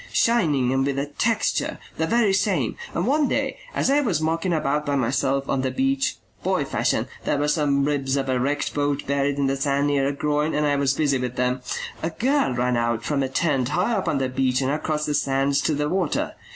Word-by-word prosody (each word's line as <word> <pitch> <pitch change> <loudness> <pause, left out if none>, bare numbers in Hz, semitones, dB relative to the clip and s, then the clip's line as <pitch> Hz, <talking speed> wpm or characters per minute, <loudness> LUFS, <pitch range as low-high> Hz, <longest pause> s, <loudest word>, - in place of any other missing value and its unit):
Shining 150 - +2
and 135 0 +2
with 140 0 -1
a 140 - 0
texture 220 +10 0 0.2
the 160 - 0
very 220 -1 +3
same. 195 - +1 0.2
And - - 0
one 290 +1 +2
day - - -1 0.2
as - - +2
I 290 +1 +4
was 205 - 0
mucking 165 +3 0
about 150 -2 0
by 145 -1 -1
myself 135 +1 0
on 135 - 0
the 130 - 0
beach, 270 - 0 0.2
boy - - 0
fashion, - - 0 0.2
there 145 - 0
were 145 +1 0
some 145 -2 +2
ribs 140 -2 0
of 135 -1 -1
a 130 -1 +1
wrecked 145 +3 -1
boat 145 -1 -1
buried 140 0 0
in 140 - +1
the 135 0 +1
sand 140 +1 0
near 140 -2 +2
a - - +1
groin 150 +2 0
and 150 0 +1
I 145 -1 +2
was 140 -1 +1
busy 140 -3 +1
with 125 -1 -3
them 125 0 0 0.4
a 165 - -1
girl 255 - +1
ran 125 0 +1
out 115 -1 0
from 145 -2 0
a 135 - -1
tent 135 -2 0
high 180 +9 +1
up 195 -4 -1
on 145 - +1
the 135 -1 0
beach 130 0 0
and 135 0 0
across 150 0 -1
the 150 - -1
sands 140 0 +1
to 155 - +1
the 150 +1 -1
water. 175 -1 -1
145 Hz, 230 wpm, -23 LUFS, 135-160 Hz, 0.4 s, I